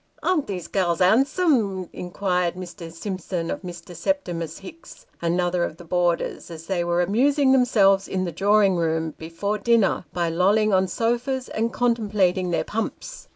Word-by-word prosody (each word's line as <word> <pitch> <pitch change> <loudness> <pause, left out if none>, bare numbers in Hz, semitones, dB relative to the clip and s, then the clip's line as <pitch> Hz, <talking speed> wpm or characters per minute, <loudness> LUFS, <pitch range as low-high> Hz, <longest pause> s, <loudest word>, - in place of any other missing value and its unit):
" - - -30
Are 365 -4 +2
these 190 - -6
gals 175 -4 0
'andsome? 225 - +2
" - - -37
inquired 180 -1 -1
Mr. 175 -2 -8
Simpson 175 -1 -4
of - - -4
Mr. 175 -1 -9
Septimus 170 - -2
Hicks, 340 +8 -13 0.2
another 175 +1 +1
of 160 - -4
the 175 - -11
boarders, 175 0 -1
as 165 -1 -9
they 180 -2 -1
were 175 +1 +1
amusing 265 - +3
themselves 205 -7 +4
in 185 -1 -2
the 175 - -3
drawing 200 +2 +3
room, 160 -1 -1
before 200 +6 -3
dinner, 230 -6 +2
by 175 -1 -1
lolling 200 +6 +2
on 190 0 +3
sofas, 240 +6 -1
and 230 +1 -1
contem 235 -4 0
plating 185 -3 +2
their 165 -2 0
pumps. 220 +6 -5
185 Hz, 165 wpm, -23 LUFS, 175-225 Hz, 0.2 s, themselves